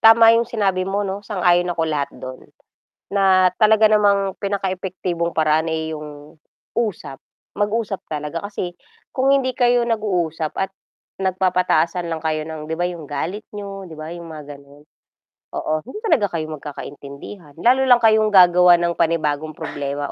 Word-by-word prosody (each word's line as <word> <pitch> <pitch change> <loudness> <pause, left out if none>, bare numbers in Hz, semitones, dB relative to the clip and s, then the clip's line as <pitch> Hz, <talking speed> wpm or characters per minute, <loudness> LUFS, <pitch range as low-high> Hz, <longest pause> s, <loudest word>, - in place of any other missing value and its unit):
tama 225 0 +8
yung 230 +1 +2
sinabi 195 -5 0
mo 200 +1 -1
'no, 195 +1 -4
sang-ayon 180 -3 +1
ako 165 - -1
lahat 150 -3 -1
do'n, 130 0 -8 0.7
na 190 -2 +5
talaga 220 0 +5
namang 200 -2 +3
pinaka 200 -1 -2
epektibong 180 -2 -3
paraan, 160 +1 +1
eh, 160 0 -3
yung 150 0 -11 0.4
usap, 185 -12 -2 0.4
mag-usap 210 -1 -1
talaga 150 +3 -4
kasi 185 -4 -5 0.4
kung 270 +1 +3
hindi 260 -2 +1
kayo 245 -1 +3
nag-uusap 175 -8 -1
at 195 0 -1 0.5
nagpapataasan 180 -2 +1
lang 160 -1 -3
kayo 155 -1 -1
ng, 155 -1 -7
'di - - 0
ba 175 - +1
yung 170 -5 -7
galit 170 +9 -4
niyo, 195 -2 -7
'di 160 - -10
ba 155 +2 -6
yung 170 -1 -9
mga 150 -2 -9
gano'n. 140 +1 -18 0.7
Oo, 155 - -3
hindi 260 - -10
talaga 300 - +3
kayo 155 -1 -2
magkakaintindihan, 145 +2 -9
lalo 250 +8 +3
lang 245 - +8
kayong 220 -1 +5
gagawa 180 -2 +7
ng 170 0 0
panibagong 155 -2 0
problema 145 0 -4
180 Hz, 155 wpm, -21 LUFS, 155-205 Hz, 0.7 s, tama